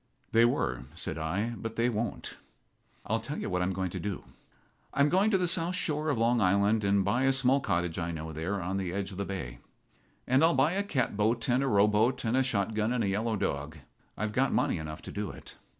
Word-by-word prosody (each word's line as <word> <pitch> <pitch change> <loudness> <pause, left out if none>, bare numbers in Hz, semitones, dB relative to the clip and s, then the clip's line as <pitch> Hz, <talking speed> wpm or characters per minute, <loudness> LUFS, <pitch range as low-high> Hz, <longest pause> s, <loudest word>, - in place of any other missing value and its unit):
"They 115 +1 +5
were," 65 - 0
said 85 - -4
I, 100 +9 -1
"but 115 0 -6
they 115 +1 +2
won't.. 115 0 -3 0.7
I'll - - 0
tell - - -6
you - - -4
what 90 0 0
I'm 90 +1 0
going 95 -1 -2
to - - -5
do. 100 -2 -4 0.7
I'm 140 +1 +4
going 190 +6 +3
to 200 - +3
the 180 -1 +1
south 175 0 +1
shore 155 -2 -1
of 140 - +1
Long 115 +1 +2
Island 100 +3 +3
and 100 -1 +2
buy 120 +7 +2
a 135 - +5
small 135 +1 +3
cottage 85 -9 -1
I 85 0 -2
know 80 -1 -5
there 85 +6 -2
on 95 +2 -2
the 95 -3 -2
edge 100 0 -3
of 95 - -8
the 100 - -1
bay. 70 -12 -5 0.7
And 130 +4 +3
I'll 165 -2 +5
buy 135 +5 +3
a 195 +2 0
catboat 115 - 0
and 125 +2 +3
a 135 - 0
rowboat 105 +3 +3
and 115 +2 +1
a 130 - +4
shotgun 110 -2 0
and 125 -2 0
a - - 0
yellow 110 +3 0
dog. 75 -4 -3 0.4
I've 110 0 -2
got 135 +4 +2
money - - +1
enough 75 0 -7
to - - -7
do 105 0 -3
it. - - -11
105 Hz, 230 wpm, -29 LUFS, 95-130 Hz, 0.7 s, They